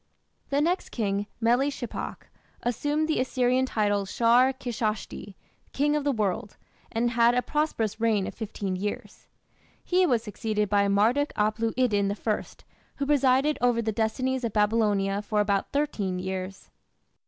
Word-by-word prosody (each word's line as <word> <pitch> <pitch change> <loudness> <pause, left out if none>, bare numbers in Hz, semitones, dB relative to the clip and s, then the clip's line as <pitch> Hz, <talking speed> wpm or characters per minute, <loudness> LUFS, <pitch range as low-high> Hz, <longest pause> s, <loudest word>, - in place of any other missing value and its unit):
The 280 +1 +1
next 350 +4 0
king, 205 -3 -2
Meli 240 +4 +3
shipak, 260 -4 -6 0.4
assumed 290 +6 0
the 315 - 0
Assyrian 255 0 +1
title 205 -4 0
"Shar 240 +5 +4
Kishshati", 220 -6 -4 0.4
"king 295 +2 +1
of 300 - 0
the 285 - +2
world", 210 -3 -2 0.3
and 235 +1 0
had 235 0 +4
a 250 - +1
prosperous 230 -8 -1
reign 215 -4 +2
of - - -5
fifteen 200 -4 -4
years. 205 +3 -5 0.6
He 365 0 +3
was 240 -6 +1
succeeded 210 -1 -2
by 200 0 +3
Marduk 225 +9 +2
aplu 215 +2 0
iddin 205 -6 +2
I, 210 +1 -1 0.5
who 280 - -2
presided 275 +1 +3
over 245 -1 +3
the 225 -1 0
destinies 255 +4 -1
of 230 -3 -2
Babylonia 210 -2 +2
for 210 0 -1
about 200 -1 0
thirteen 220 -11 -1
years. 185 +1 -5
230 Hz, 145 wpm, -27 LUFS, 205-260 Hz, 0.6 s, Shar